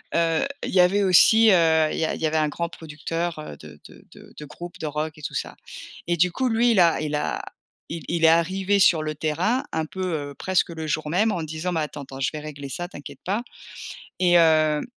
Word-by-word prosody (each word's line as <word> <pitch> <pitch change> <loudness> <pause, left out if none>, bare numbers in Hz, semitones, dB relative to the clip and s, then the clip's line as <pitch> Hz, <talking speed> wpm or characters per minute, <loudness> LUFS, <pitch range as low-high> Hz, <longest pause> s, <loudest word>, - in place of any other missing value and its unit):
heu, 165 +5 +2 0.2
il - - -3
y 185 - +2
avait 195 +3 +4
aussi 220 +4 +6
heu, 160 -3 +4
il - - -4
y 160 - +1
a - - -2
il - - -7
y 160 - +2
avait 155 +1 0
un 155 -1 +2
grand 170 +2 -3
producteur, 165 +1 -5
heu, 115 - -8
de 75 -1 -14
de - - -17
de - - -16
de 150 - -8
groupe 175 +4 -10
de 160 - -5
rock 155 +1 -4
et - - -13
tout - - -5
ça. - - -4 0.5
Et 175 - +1
du 175 +1 +2
coup 260 +7 -1
lui 235 +1 +2
il 205 - +3
a 170 -3 +4
il 150 -1 -2
a 150 - -2 0.5
il 165 -1 -6
il 170 -1 -2
est - - +8
arrivé 185 +5 +2
sur 170 -4 +5
le 155 0 -4
terrain 170 - 0
un 160 -1 -1
peu, 190 +3 -6 0.3
heu, - - -13
presque 185 -2 0
le 160 -1 -6
jour 150 0 -2
même, 210 +7 +2
en 175 - -2
disant: 160 +3 -4
«Mais 165 -2 -1
attends, 150 -1 -5
attends, 135 0 -10
je 135 - 0
vais 155 - -5
régler 145 -2 -8
ça, 175 +6 -5
t'inquiète 145 -5 -11
pas» 205 +6 -1 0.8
et 180 -1 +3
hem, 155 -2 +4
165 Hz, 245 wpm, -24 LUFS, 155-180 Hz, 0.8 s, est